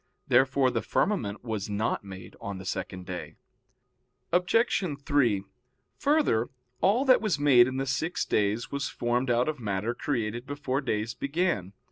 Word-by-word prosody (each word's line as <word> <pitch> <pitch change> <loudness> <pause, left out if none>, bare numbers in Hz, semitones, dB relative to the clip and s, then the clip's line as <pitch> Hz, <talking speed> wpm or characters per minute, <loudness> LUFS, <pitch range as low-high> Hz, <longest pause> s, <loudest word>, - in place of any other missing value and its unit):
Therefore 130 -1 +4
the 115 -2 -1
firmament 110 - -1
was 110 -4 -3
not 105 +1 -1
made 95 -1 -10
on 100 -1 -5
the 95 - -9
second 95 -1 -4
day. 90 -1 -6 1.0
Obj. 180 +5 +2 0.2
3: 120 -9 +2 0.6
Further, 285 - +2 0.3
all 230 - +3
that 255 -2 +6
was 210 -9 +1
made 135 -4 +6
in 130 0 -3
the 135 - -1
six 145 +6 -1
days 105 +3 0
was 140 0 -2
formed 120 +2 -1
out 120 +2 +2
of 155 -3 -2
matter 105 +1 -2
created 120 -2 -3
before 140 -1 -2
days 115 -3 -2
began. 140 - -1
125 Hz, 150 wpm, -28 LUFS, 105-145 Hz, 1.0 s, that